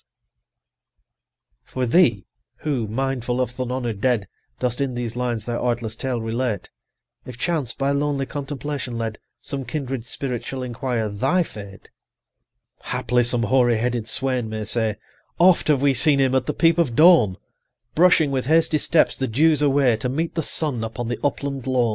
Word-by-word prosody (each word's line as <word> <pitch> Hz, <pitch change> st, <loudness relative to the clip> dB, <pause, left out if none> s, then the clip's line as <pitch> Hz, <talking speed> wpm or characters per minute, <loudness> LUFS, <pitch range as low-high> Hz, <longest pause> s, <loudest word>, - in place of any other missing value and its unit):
For 130 Hz, -1 st, -3 dB
thee, 120 Hz, -, +3 dB, 0.4 s
who, 135 Hz, -8 st, -1 dB
mindful 125 Hz, +1 st, -2 dB
of 125 Hz, -2 st, 0 dB
th' 125 Hz, -, -17 dB
unhonour'd 125 Hz, -4 st, -3 dB
dead, 120 Hz, -6 st, +1 dB, 0.3 s
Dost 125 Hz, 0 st, -1 dB
in 130 Hz, -3 st, -1 dB
these 120 Hz, -2 st, -4 dB
lines 120 Hz, -3 st, -2 dB
their 120 Hz, -1 st, -3 dB
artless 120 Hz, -3 st, -2 dB
tale 125 Hz, 0 st, -3 dB
relate, 115 Hz, -2 st, -3 dB, 0.5 s
If 125 Hz, -2 st, -10 dB
chance, 150 Hz, -5 st, -1 dB
by 140 Hz, 0 st, 0 dB
lonely 140 Hz, -1 st, 0 dB
contemplation 140 Hz, -2 st, -5 dB
led, 115 Hz, -2 st, -4 dB
95 -, -, -52 dB, 0.2 s
Some 135 Hz, -2 st, -5 dB
kindred 135 Hz, -5 st, -4 dB
spirit 125 Hz, -4 st, -3 dB
shall 130 Hz, -1 st, -5 dB
inquire 120 Hz, -2 st, -2 dB
thy 105 Hz, -, +1 dB
fate, 100 Hz, -8 st, -11 dB, 0.9 s
Haply 125 Hz, +1 st, 0 dB
some 120 Hz, 0 st, +1 dB
hoary 120 Hz, -2 st, +3 dB
headed 120 Hz, -1 st, -2 dB
swain 130 Hz, -4 st, +1 dB
may 110 Hz, 0 st, -4 dB
say, 110 Hz, -1 st, 0 dB, 0.4 s
"Oft 180 Hz, 0 st, +4 dB
have 145 Hz, -3 st, +2 dB
we 140 Hz, -1 st, +4 dB
seen 145 Hz, +2 st, +5 dB
him 135 Hz, -1 st, +2 dB
at 130 Hz, -1 st, +1 dB
the -, -, 0 dB
peep 165 Hz, 0 st, +3 dB
of 135 Hz, -9 st, +1 dB
dawn 155 Hz, -, +6 dB, 0.6 s
Brushing 160 Hz, -3 st, +4 dB
with 130 Hz, -2 st, -2 dB
hasty 160 Hz, 0 st, +3 dB
steps 165 Hz, +1 st, +2 dB
the 130 Hz, -, -2 dB
dews 150 Hz, +6 st, +3 dB
away, 135 Hz, -5 st, +3 dB
To 125 Hz, +3 st, -3 dB
meet 160 Hz, +6 st, -2 dB
the 165 Hz, -, -1 dB
sun 145 Hz, -6 st, -1 dB
upon 115 Hz, +1 st, -4 dB
the 120 Hz, -, -3 dB
upland 140 Hz, -2 st, -2 dB
lawn. 125 Hz, -3 st, +2 dB
130 Hz, 170 wpm, -22 LUFS, 115-140 Hz, 0.9 s, dawn